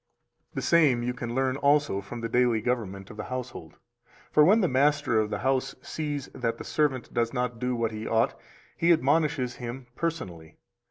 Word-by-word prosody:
277 -, -, -30 dB
The -, -, -2 dB
same 145 Hz, -8 st, +4 dB
you 125 Hz, -, 0 dB
can 120 Hz, -1 st, -5 dB
learn 130 Hz, 0 st, +1 dB
also 145 Hz, -8 st, +2 dB
from 115 Hz, +4 st, -8 dB
the 115 Hz, -, -2 dB
daily 120 Hz, -1 st, +2 dB
government 105 Hz, -5 st, -3 dB
of 105 Hz, -, -12 dB
the 105 Hz, -, -5 dB
household. 125 Hz, 0 st, -6 dB, 0.6 s
For 150 Hz, -, +6 dB
when 210 Hz, +8 st, +5 dB
the 185 Hz, -, +3 dB
master 145 Hz, -3 st, +2 dB
of 105 Hz, -1 st, 0 dB
the 105 Hz, -, -2 dB
house 130 Hz, +4 st, 0 dB
sees 145 Hz, -3 st, -4 dB
that 115 Hz, -2 st, -2 dB
the -, -, -7 dB
servant 140 Hz, -5 st, -1 dB
does 115 Hz, +1 st, 0 dB
not 125 Hz, -2 st, -2 dB
do 125 Hz, 0 st, -1 dB
what 115 Hz, -1 st, -1 dB
he 110 Hz, 0 st, -5 dB
ought, 115 Hz, 0 st, +2 dB, 0.4 s
he 170 Hz, +1 st, +3 dB
admonishes 145 Hz, -5 st, +2 dB
him 125 Hz, 0 st, -6 dB
personally. 95 Hz, -, -4 dB
125 Hz, 195 wpm, -27 LUFS, 115-145 Hz, 0.6 s, For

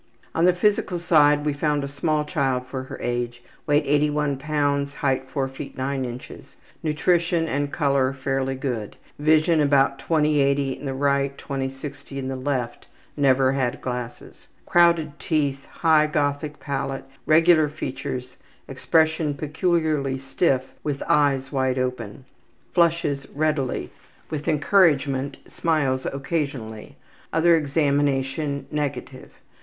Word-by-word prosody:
On 165 Hz, -, +2 dB
the 180 Hz, -, +5 dB
physical 195 Hz, -1 st, +1 dB
side 150 Hz, -3 st, +4 dB
we 150 Hz, -, +1 dB
found 145 Hz, 0 st, 0 dB
a -, -, -3 dB
small 150 Hz, +2 st, -1 dB
child 135 Hz, -5 st, -1 dB
for 130 Hz, 0 st, -6 dB
her -, -, -8 dB
age; 120 Hz, 0 st, -3 dB, 0.2 s
weight 145 Hz, 0 st, +3 dB
81 145 Hz, -1 st, +1 dB
lbs., 140 Hz, -1 st, 0 dB
height 130 Hz, -1 st, -1 dB
4 135 Hz, 0 st, -1 dB
ft. 135 Hz, +1 st, -9 dB
9 130 Hz, 0 st, -2 dB
in. 120 Hz, 0 st, -5 dB, 0.6 s
Nutrition 165 Hz, +2 st, +1 dB
and 145 Hz, -1 st, -1 dB
color 140 Hz, -4 st, +1 dB
fairly 135 Hz, 0 st, -2 dB
good. 125 Hz, -6 st, -4 dB, 0.2 s
Vision 155 Hz, +2 st, +3 dB
about 140 Hz, -1 st, +3 dB
20/80 140 Hz, -3 st, +1 dB
R. 140 Hz, 0 st, +1 dB
and 140 Hz, 0 st, -3 dB
20/60 135 Hz, 0 st, -5 dB
L.; 120 Hz, -2 st, -3 dB, 0.5 s
never 135 Hz, -2 st, +3 dB
had 130 Hz, -3 st, -1 dB
glasses. 125 Hz, -1 st, -6 dB, 0.2 s
Crowded 170 Hz, -4 st, +3 dB
teeth. 140 Hz, -4 st, -1 dB
High 155 Hz, -2 st, +3 dB
Gothic 145 Hz, 0 st, -1 dB
palate. 135 Hz, -1 st, -3 dB, 0.2 s
Regular 160 Hz, -1 st, +5 dB
features. 130 Hz, -3 st, -5 dB, 0.3 s
Expression 160 Hz, +2 st, +1 dB
peculiarly 155 Hz, -2 st, 0 dB
stiff 135 Hz, 0 st, 0 dB
with 145 Hz, -2 st, -2 dB
eyes 135 Hz, -2 st, +2 dB
wide 130 Hz, -2 st, 0 dB
open. 125 Hz, -2 st, -3 dB, 0.5 s
Flushes 165 Hz, -5 st, +1 dB
readily. 150 Hz, -3 st, -1 dB, 0.4 s
With 150 Hz, 0 st, -4 dB
encouragement 145 Hz, -4 st, +2 dB
smiles 140 Hz, -6 st, 0 dB
occasionally. 135 Hz, -6 st, -4 dB, 0.4 s
Other 170 Hz, +1 st, +4 dB
examination 140 Hz, -1 st, 0 dB
negative. 150 Hz, -2 st, -4 dB
140 Hz, 115 wpm, -24 LUFS, 135-155 Hz, 0.6 s, the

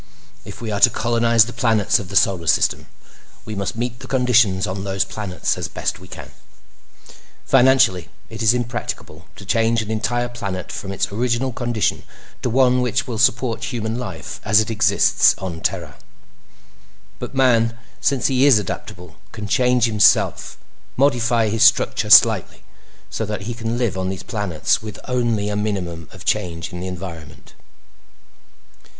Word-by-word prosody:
If -, -, -10 dB
we 110 Hz, -, -4 dB
are 100 Hz, -, -2 dB
to -, -, +7 dB
colonize 115 Hz, -1 st, +2 dB
the 120 Hz, -, -8 dB
planets 110 Hz, -4 st, +2 dB
of 95 Hz, -, -8 dB
the 100 Hz, -, -7 dB
Solar 90 Hz, -4 st, +2 dB
System, -, -, +1 dB, 0.6 s
we 110 Hz, -, -6 dB
must 100 Hz, -1 st, -4 dB
meet 120 Hz, +1 st, -4 dB
the -, -, -10 dB
conditions 125 Hz, -7 st, +2 dB
on 95 Hz, +1 st, -5 dB
those 95 Hz, -2 st, -1 dB
planets 100 Hz, -4 st, -3 dB
as -, -, -3 dB
best -, -, -4 dB
we -, -, -14 dB
can. -, -, -10 dB, 1.1 s
"Financially, 120 Hz, -10 st, +3 dB, 0.2 s
it 110 Hz, 0 st, -9 dB
is 115 Hz, +2 st, +4 dB
impracticable 115 Hz, -9 st, -5 dB
to 100 Hz, -, -12 dB
change 115 Hz, +2 st, +1 dB
an 110 Hz, -, -6 dB
entire 120 Hz, +2 st, -1 dB
planet 100 Hz, -7 st, -6 dB
from 95 Hz, -, -6 dB
its 100 Hz, -, -2 dB
original 120 Hz, +4 st, -1 dB
condition 120 Hz, -3 st, -1 dB, 0.4 s
to -, -, -1 dB
one 125 Hz, +1 st, +3 dB
which 125 Hz, 0 st, -1 dB
will 120 Hz, -5 st, -5 dB
support 120 Hz, -1 st, +1 dB
human 115 Hz, -2 st, -3 dB
life 95 Hz, -10 st, -7 dB
as 105 Hz, 0 st, +4 dB
it 110 Hz, +1 st, -1 dB
exists 110 Hz, 0 st, +3 dB
on 85 Hz, -4 st, -6 dB
Terra. 85 Hz, -9 st, -3 dB, 1.2 s
"But -, -, -7 dB
man, 115 Hz, -3 st, +2 dB, 0.2 s
since 135 Hz, -2 st, 0 dB
he 135 Hz, +1 st, +3 dB
is 135 Hz, -6 st, +6 dB
adaptable, 90 Hz, -4 st, -7 dB
can 105 Hz, -2 st, -7 dB
change 125 Hz, +2 st, +2 dB
himself—modify 120 Hz, +2 st, +1 dB
his 110 Hz, +1 st, +1 dB
structure -, -, +3 dB
slightly—so -, -, +2 dB
that 105 Hz, -2 st, -4 dB
he 115 Hz, +4 st, -5 dB
can 115 Hz, 0 st, -4 dB
live 120 Hz, -6 st, -1 dB
on 95 Hz, 0 st, -2 dB
these 95 Hz, 0 st, -6 dB
planets 100 Hz, -, -1 dB
with 110 Hz, -2 st, -8 dB
only 120 Hz, -5 st, 0 dB
a 105 Hz, -, -3 dB
minimum 90 Hz, -6 st, -4 dB
of -, -, -13 dB
change 85 Hz, -2 st, -2 dB
in 90 Hz, -, -6 dB
the 90 Hz, -, -5 dB
environment." 85 Hz, -4 st, -9 dB
110 Hz, 155 wpm, -20 LUFS, 95-120 Hz, 1.2 s, to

